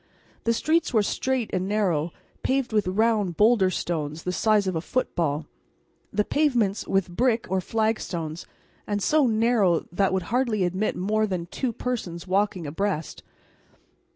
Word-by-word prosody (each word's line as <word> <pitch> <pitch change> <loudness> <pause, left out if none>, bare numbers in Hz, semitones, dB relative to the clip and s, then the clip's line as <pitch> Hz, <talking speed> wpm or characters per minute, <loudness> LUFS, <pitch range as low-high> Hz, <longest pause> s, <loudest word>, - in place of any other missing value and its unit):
The 230 - +3
streets 315 0 +1
were 215 - +5
straight 260 +2 -1
and 185 0 0
narrow, 180 -6 0 0.3
paved 260 -3 0
with 210 -3 +2
round 205 -2 +1
boulder 210 -3 +5
stones 160 -3 -3
the 180 - -1
size 210 +3 +2
of 185 -2 -1
a 160 - -1
football, 160 - -1 0.7
the 210 0 +1
pavements 240 -9 +1
with 190 -2 0
brick 235 0 +2
or 190 0 +1
flagstones, 180 -7 -2 0.4
and 205 -1 -1
so 295 +6 +3
narrow 220 -6 +3
they 195 +2 +2
would 190 -1 -1
hardly 235 -6 +1
admit 185 +4 0
of - - -5
more 215 +3 +1
than 180 -4 -3
two 245 +8 -3
persons 215 -8 -4
walking 190 -2 0
abreast. 165 +2 -3
200 Hz, 155 wpm, -25 LUFS, 180-230 Hz, 0.7 s, were